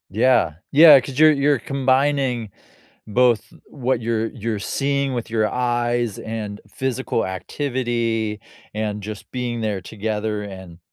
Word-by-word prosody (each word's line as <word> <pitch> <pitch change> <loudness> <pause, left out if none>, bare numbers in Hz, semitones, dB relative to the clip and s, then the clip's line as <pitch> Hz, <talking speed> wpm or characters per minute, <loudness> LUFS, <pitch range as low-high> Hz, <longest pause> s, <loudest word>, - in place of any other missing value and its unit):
Yeah, 115 -5 +3 0.2
yeah, 150 -1 +9
'cause 130 +1 -7
you're 155 0 +8
you're 140 -2 +2
combining, 135 -2 +1 0.6
both 120 +1 +3 0.2
what 130 -2 -2
you're 115 -1 0
you're 110 -1 -4
seeing 140 +6 -1
with 120 -2 -4
your 110 -1 +1
eyes 120 -2 -1
and 110 -2 -5
physical 130 +1 -2
activity 115 +1 -2 0.3
and 105 -1 -3
just 105 0 -8
being 120 -2 -3
there 105 -3 -2
together, 105 0 -3
and 95 -4 -10
115 Hz, 125 wpm, -21 LUFS, 105-130 Hz, 0.6 s, yeah